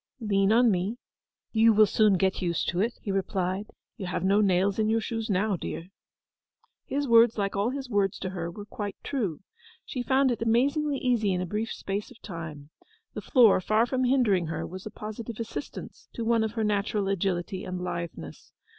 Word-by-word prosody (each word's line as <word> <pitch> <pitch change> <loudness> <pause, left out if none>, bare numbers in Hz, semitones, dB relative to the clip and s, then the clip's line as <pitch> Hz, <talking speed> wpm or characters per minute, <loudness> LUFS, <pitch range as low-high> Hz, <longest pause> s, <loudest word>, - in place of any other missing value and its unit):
'Lean 200 -3 +2
on 235 +1 +5
me; 195 +5 -1 0.5
you 225 0 +5
will 215 0 +6
soon 210 0 +3
get 190 +1 +1
used 170 -2 -1
to 175 - -1
it,' 235 +3 -1
he 200 - -2
replied. 190 +1 -1 0.3
'You 195 -5 -5
have 180 -1 -2
no 200 +2 +4
nails 195 +1 +2
in 215 0 +2
your 225 +1 +2
shoes 225 0 -4
now, 200 +1 +1
dear.' 170 0 -6 1.0
His 285 +1 -2
words, 230 -1 +6
like 200 -1 -1
all 200 +4 +1
his 270 0 -4
words 200 -4 +1
to 185 - -4
her, 175 -2 -4
were 205 +4 -9
quite 205 -1 -5
true. 210 - -2 0.4
She 255 - -4
found 265 +1 +3
it 235 - -3
amazingly 275 +6 +2
easy 235 -7 +1
in 180 - -1
a - - -2
brief 210 +5 -3
space 200 +1 -4
of - - -16
time. 160 -5 -8 0.4
The - - -5
floor, 235 -8 +5
far 215 +4 +2
from 255 +1 0
hindering 225 -10 +2
her, 165 - -3
was 185 +3 -8
a - - -5
positive 215 +2 -7
assistance 230 +5 -7
to 230 - -4
one 230 -1 +3
of 220 0 -2
her 225 -2 -1
natural 205 -1 0
agility 190 0 -1
and 185 -1 -4
litheness. 170 - -6
210 Hz, 195 wpm, -27 LUFS, 185-230 Hz, 1.0 s, will